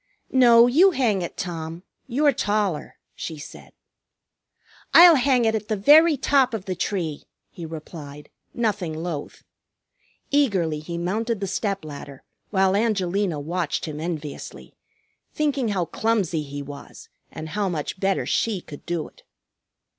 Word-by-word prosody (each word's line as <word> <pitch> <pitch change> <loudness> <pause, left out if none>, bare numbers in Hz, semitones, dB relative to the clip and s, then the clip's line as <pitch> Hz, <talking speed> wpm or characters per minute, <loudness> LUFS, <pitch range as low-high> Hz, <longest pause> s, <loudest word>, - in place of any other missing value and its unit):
"No, 240 -2 +7
you 315 +11 +5
hang 240 - +1
it, 175 - -6
Tom. 165 -1 -5 0.2
You're 285 +4 +3
taller," 205 -8 -1 0.2
she 160 - -6
said. 145 - -11 1.2
"I'll 345 0 +10
hang 260 -4 +3
it 220 - +2
at 215 -1 -3
the 215 - 0
very 300 +9 +6
top 265 -2 +2
of 200 -3 -6
the 185 - -2
tree!" 170 -4 -3 0.3
he 170 -2 -8
replied, 150 -2 -9 0.2
nothing 205 -8 -2
loath. 160 -2 -6 0.9
Eagerly 195 - +1
he 170 +3 -6
mounted 215 +6 -2
the 200 - -2
step 195 -2 -2
ladder, 140 -2 -9 0.3
while 190 -1 +2
Angelina 200 -5 0
watched 170 +2 -2
him 155 -2 -6
enviously, 155 -3 -6 0.6
thinking 285 -5 0
how 195 -5 0
clumsy 200 -6 0
he 145 -1 -6
was, 140 0 -11 0.2
and 160 - -7
how 200 +3 -1
much 165 +2 -4
better 195 0 0
she 220 -4 0
could 150 -4 -12
do 170 -2 -2
it. - - -20
190 Hz, 140 wpm, -23 LUFS, 160-230 Hz, 1.2 s, I'll